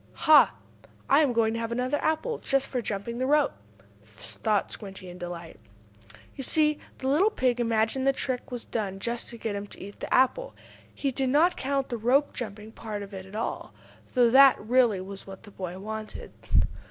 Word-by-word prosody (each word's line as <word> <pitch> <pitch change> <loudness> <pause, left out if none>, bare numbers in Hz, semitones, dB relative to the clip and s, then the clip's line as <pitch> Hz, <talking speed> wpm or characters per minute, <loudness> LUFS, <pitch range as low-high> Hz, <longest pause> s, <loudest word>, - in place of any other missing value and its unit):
"Ha! 310 -2 +7 0.5
I 280 - +5
am 295 -5 +3
going 225 -1 +2
to 230 - -2
have 230 0 -3
another 255 +4 0
apple, 390 +10 0
just 275 0 +1
for 250 - -3
jumping 230 +3 -4
a 260 - +1
rope," 295 0 +3 0.5
thought 110 - -2
Squinty, 195 -3 -8
in 180 - -11
delight. 175 -4 -7 0.8
You 270 - -6
see 300 +2 +2 0.2
the 260 - -4
little 320 +10 +4
pig 255 - 0
imagined 230 +3 +1
the - - +6
trick 260 -2 -4
was 245 -2 -6
done 200 -4 -3
just 235 +3 -3
to 235 - -9
get 220 -2 -3
him 200 0 -5
to - - -11
eat 200 +1 -10
the - - -6
apple. 380 - +2 0.4
He 275 - -2
did 265 0 -1
not 320 +7 +4
count 275 0 -1
the 240 - -2
rope 260 +6 +2
jumping 215 -2 -6
part 215 -2 -6
of 200 0 -11
it 190 -1 -7
at 195 - -12
all, 225 - -4 0.4
though 240 -2 +5
that, 270 +1 +7
really, 230 -3 +2
was 195 +1 -9
what 195 0 -10
the 205 - -13
boy 185 -2 -6
wanted. 215 +2 -7
235 Hz, 195 wpm, -27 LUFS, 205-270 Hz, 0.8 s, Ha